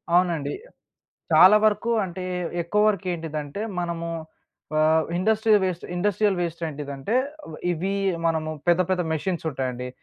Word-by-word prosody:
అవునండి. 170 Hz, -5 st, +1 dB, 0.8 s
చాలా 190 Hz, +4 st, +8 dB
వరకు 215 Hz, +2 st, +2 dB
అంటే 185 Hz, 0 st, -6 dB, 0.4 s
ఎక్కువరకు 210 Hz, +1 st, +1 dB
ఏంటిదంటే, 155 Hz, 0 st, -5 dB, 0.2 s
మనము 170 Hz, -1 st, -3 dB, 0.7 s
ఆహ్, 160 Hz, +1 st, +4 dB
ఇండస్ట్రియల్ 215 Hz, +3 st, +3 dB
వేస్ట్ 180 Hz, -2 st, -2 dB
ఇండస్ట్రియల్ 200 Hz, +1 st, +1 dB
వేస్ట్ 170 Hz, -1 st, -3 dB
ఏంటిదంటే, 140 Hz, -, -4 dB, 0.3 s
అవ్ 160 Hz, -, -9 dB, 0.2 s
ఇవి 185 Hz, +4 st, -2 dB, 0.3 s
మనము 160 Hz, -1 st, 0 dB, 0.2 s
పెద్ద 175 Hz, +1 st, +5 dB
పెద్ద 185 Hz, -1 st, +1 dB
మెషిన్స్ 170 Hz, +2 st, -2 dB
ఉంటాయండి. 125 Hz, -2 st, -3 dB
175 Hz, 120 wpm, -24 LUFS, 155-195 Hz, 0.8 s, చాలా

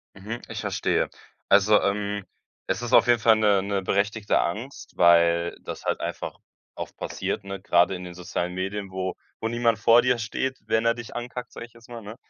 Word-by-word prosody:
Mhm, 110 Hz, +5 st, -6 dB
ich -, -, -5 dB
verstehe. -, -, 0 dB, 0.4 s
Also, 100 Hz, +1 st, +5 dB
ähm, 100 Hz, 0 st, -1 dB, 0.4 s
es -, -, -2 dB
ist 120 Hz, +1 st, -4 dB
auf -, -, +7 dB
jeden 120 Hz, -1 st, +4 dB
Fall 110 Hz, 0 st, +5 dB
'ne 105 Hz, -3 st, +3 dB
'ne 100 Hz, -1 st, -1 dB
berechtigte 105 Hz, +3 st, +1 dB
Angst, 115 Hz, +10 st, -4 dB
weil 85 Hz, 0 st, +4 dB
das -, -, -7 dB
halt -, -, -1 dB
einfach -, -, -4 dB, 0.4 s
oft -, -, -7 dB
passiert, -, -, -4 dB
ne, 100 Hz, -1 st, -6 dB
grade 90 Hz, 0 st, +3 dB
in 90 Hz, 0 st, -6 dB
den 90 Hz, -, -8 dB
sozialen 90 Hz, 0 st, -4 dB
Medien, 95 Hz, +1 st, -4 dB
wo 95 Hz, 0 st, -3 dB, 0.3 s
wo 110 Hz, -, -1 dB
niemand 115 Hz, -1 st, +1 dB
vor 115 Hz, +2 st, +6 dB
dir 125 Hz, -1 st, +2 dB
steht, 125 Hz, +4 st, -3 dB
wenn 110 Hz, +1 st, +1 dB
er 115 Hz, 0 st, +3 dB
dich 120 Hz, -2 st, -9 dB
ankackt, 125 Hz, +1 st, -6 dB
sag -, -, -8 dB
ich 120 Hz, -, -14 dB
jetzt 115 Hz, 0 st, -18 dB
mal, 120 Hz, -1 st, -8 dB
ne? 105 Hz, +3 st, -9 dB
105 Hz, 200 wpm, -25 LUFS, 95-115 Hz, 0.4 s, auf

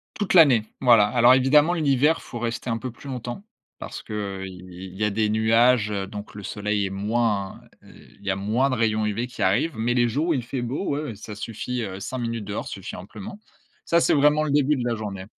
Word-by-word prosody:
Toute 205 Hz, -3 st, -1 dB
l'année. 140 Hz, -, +7 dB, 0.2 s
Voilà, 115 Hz, -5 st, +6 dB
alors 120 Hz, +2 st, +5 dB
évidemment 145 Hz, +6 st, +4 dB
l'hiver, 150 Hz, -1 st, +2 dB
faut 120 Hz, -, -8 dB
rester 120 Hz, +2 st, -3 dB
un 115 Hz, -, 0 dB
peu 130 Hz, +2 st, -6 dB
plus 120 Hz, -, -14 dB
longtemps. 125 Hz, -, -6 dB, 0.3 s
Parce -, -, -8 dB
que, -, -, -13 dB, 0.3 s
heu, -, -, -4 dB
il 90 Hz, -1 st, -10 dB
il 90 Hz, +1 st, -9 dB
y 105 Hz, -, +2 dB
a -, -, +2 dB
des 105 Hz, +1 st, 0 dB
nuages, 115 Hz, +1 st, +3 dB, 0.2 s
donc 105 Hz, 0 st, -9 dB
le 105 Hz, -, -8 dB
soleil 105 Hz, +1 st, -2 dB
est -, -, -3 dB
moins, 105 Hz, 0 st, -1 dB, 0.2 s
heu, -, -, -16 dB, 0.3 s
il -, -, -18 dB
y -, -, -1 dB
a 95 Hz, -, +1 dB
moins 110 Hz, +8 st, +1 dB
de 130 Hz, -, 0 dB
rayons 110 Hz, -2 st, +1 dB
UV 110 Hz, +3 st, -2 dB
qui 125 Hz, -, -9 dB
arrivent. 100 Hz, +9 st, +1 dB
Mais 115 Hz, +2 st, 0 dB
les 120 Hz, -1 st, +2 dB
jours 145 Hz, +8 st, -1 dB
où 170 Hz, -, +2 dB
il 130 Hz, -5 st, -1 dB
fait 125 Hz, +2 st, -4 dB
beau, 130 Hz, +10 st, -3 dB
ouais, 145 Hz, +1 st, -1 dB
ouais, 125 Hz, -8 st, -6 dB
ça 105 Hz, +1 st, -9 dB
suffit, 115 Hz, +3 st, -4 dB
heu, 95 Hz, -2 st, -6 dB
5 130 Hz, +6 st, -5 dB
minutes 115 Hz, -2 st, -3 dB
dehors 100 Hz, +1 st, -5 dB
suffit 95 Hz, -, -7 dB
amplement. 100 Hz, -, -9 dB, 0.5 s
Ça, 170 Hz, 0 st, +3 dB
c'est -, -, +3 dB
vraiment 150 Hz, +1 st, +4 dB
le 155 Hz, -, -1 dB
début 145 Hz, +1 st, +3 dB
de 125 Hz, -, -3 dB
la 120 Hz, -, 0 dB
journée. 100 Hz, -3 st, -6 dB
115 Hz, 240 wpm, -24 LUFS, 105-130 Hz, 0.5 s, l'année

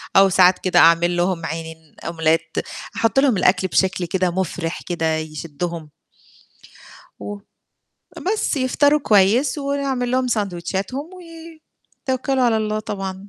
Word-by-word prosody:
أو 195 Hz, 0 st, +7 dB
ساعات 185 Hz, 0 st, +5 dB
كده 180 Hz, -2 st, +2 dB
أعمل 170 Hz, +1 st, +4 dB
لهم 175 Hz, -2 st, 0 dB
عينين 160 Hz, -1 st, -7 dB
omelette 165 Hz, -1 st, 0 dB, 0.3 s
أحُط 225 Hz, +2 st, +2 dB
لهم 270 Hz, -6 st, +3 dB
الأكل 185 Hz, 0 st, +2 dB
بشكل 185 Hz, -1 st, 0 dB
كده 185 Hz, 0 st, 0 dB
مُفرِح 175 Hz, -2 st, -3 dB
كده 165 Hz, -2 st, 0 dB
يشدّهم. 160 Hz, +1 st, -6 dB, 1.3 s
و 205 Hz, 0 st, -7 dB, 0.9 s
بس 420 Hz, -6 st, 0 dB
يفطروا 285 Hz, +3 st, +2 dB
كويس 225 Hz, +6 st, +3 dB
ونعمل 275 Hz, -3 st, -2 dB
لهم 255 Hz, 0 st, +1 dB
ساندويتشاتهم 200 Hz, -, -3 dB
وي 330 Hz, -2 st, -12 dB, 0.5 s
توكّلوا 260 Hz, 0 st, 0 dB
على 235 Hz, -2 st, +3 dB
الله 215 Hz, 0 st, -1 dB
طبعًا. 195 Hz, -2 st, -6 dB
195 Hz, 120 wpm, -21 LUFS, 175-255 Hz, 1.3 s, أو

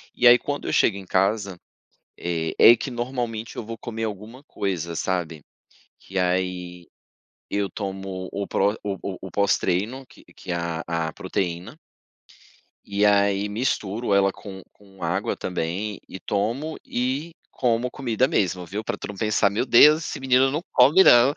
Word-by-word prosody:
e 125 Hz, -, 0 dB
aí 120 Hz, 0 st, +9 dB
quando 145 Hz, 0 st, -4 dB
eu -, -, -2 dB
chego 105 Hz, -, +3 dB
em 95 Hz, -, -9 dB
casa, 95 Hz, 0 st, 0 dB, 0.6 s
eh, 85 Hz, -2 st, -3 dB
é 120 Hz, -, +9 dB
que 130 Hz, -, -5 dB
normalmente 120 Hz, -2 st, -4 dB
eu -, -, -5 dB
vou 115 Hz, +1 st, -6 dB
comer 115 Hz, -1 st, -5 dB
alguma 110 Hz, +5 st, -6 dB
coisa, 90 Hz, -, -3 dB
sabe, 85 Hz, -4 st, -2 dB, 0.5 s
que 95 Hz, 0 st, -5 dB
aí 90 Hz, -1 st, -2 dB, 0.6 s
eu 100 Hz, -1 st, 0 dB
tomo 95 Hz, -2 st, -5 dB
o 100 Hz, 0 st, -3 dB
pró 100 Hz, +3 st, +1 dB
o 100 Hz, -1 st, -2 dB
o 95 Hz, -2 st, -5 dB
o -, -, -9 dB
pós-treino 100 Hz, +6 st, 0 dB
que -, -, -19 dB
que 90 Hz, -, -8 dB
a 85 Hz, -1 st, -3 dB
a 80 Hz, -1 st, -2 dB
proteína. 90 Hz, -, -4 dB, 1.1 s
E 100 Hz, +1 st, +1 dB
aí 100 Hz, 0 st, +3 dB
misturo 110 Hz, -1 st, -1 dB
ela 100 Hz, 0 st, +4 dB
com 95 Hz, -1 st, -10 dB
com 95 Hz, -3 st, -15 dB
água 90 Hz, +5 st, -1 dB
também 95 Hz, +4 st, -3 dB
e 95 Hz, -, -9 dB
tomo 115 Hz, +13 st, -2 dB
e 135 Hz, +7 st, -2 dB, 0.2 s
como 120 Hz, 0 st, 0 dB
comida 125 Hz, -1 st, 0 dB
mesmo, 90 Hz, -6 st, 0 dB
viu, 105 Hz, +5 st, -4 dB
pra -, -, -3 dB
tu -, -, -7 dB
não 105 Hz, -, -6 dB
pensar 105 Hz, 0 st, +2 dB
"meu 105 Hz, +5 st, -1 dB
Deus, 150 Hz, +6 st, +7 dB
esse -, -, -5 dB
menino 130 Hz, 0 st, +3 dB
não 150 Hz, +3 st, -2 dB
come 145 Hz, +9 st, +6 dB
não," 120 Hz, -1 st, +7 dB
é. -, -, -8 dB
100 Hz, 165 wpm, -24 LUFS, 95-120 Hz, 1.1 s, aí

